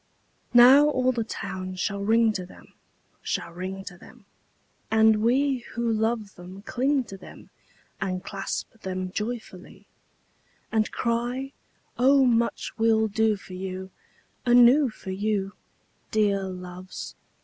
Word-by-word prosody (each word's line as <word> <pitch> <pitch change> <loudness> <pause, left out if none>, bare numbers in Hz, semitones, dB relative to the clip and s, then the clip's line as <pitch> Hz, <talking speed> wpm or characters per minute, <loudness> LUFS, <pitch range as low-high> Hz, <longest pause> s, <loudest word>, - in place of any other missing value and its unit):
II - - -42
Now 260 +4 +9
all 255 -3 +2
the 235 -2 -2
town 190 -3 -6
shall 200 +2 -2
ring 225 +1 +3
to 185 - -4
them, 180 - -16 0.5
Shall 170 - -3
ring 190 +3 -6
to 180 -2 -10
them, 230 0 -17 0.6
And 220 -1 +4
we 265 +3 +2 0.2
who 235 -1 0
love 220 -2 -1
them 185 +2 -11
cling 265 +4 0
to 195 -4 -10
them 185 - -14 0.5
And 185 -1 -2
clasp 200 +2 -5
them 185 -1 -4
joyfully; 215 -3 -6 0.9
And 220 -1 +1
cry, 245 +3 -2 0.5
"O 270 +2 +5
much 235 -1 +1
we'll 220 -1 +3
do 220 +1 +2
for 195 -2 -12
you 190 0 -6 0.5
Anew 245 +3 +6
for 195 -3 -8
you, 200 0 -1 0.6
Dear 200 -2 +1
Loves! 185 0 -8
215 Hz, 130 wpm, -26 LUFS, 190-240 Hz, 0.9 s, Now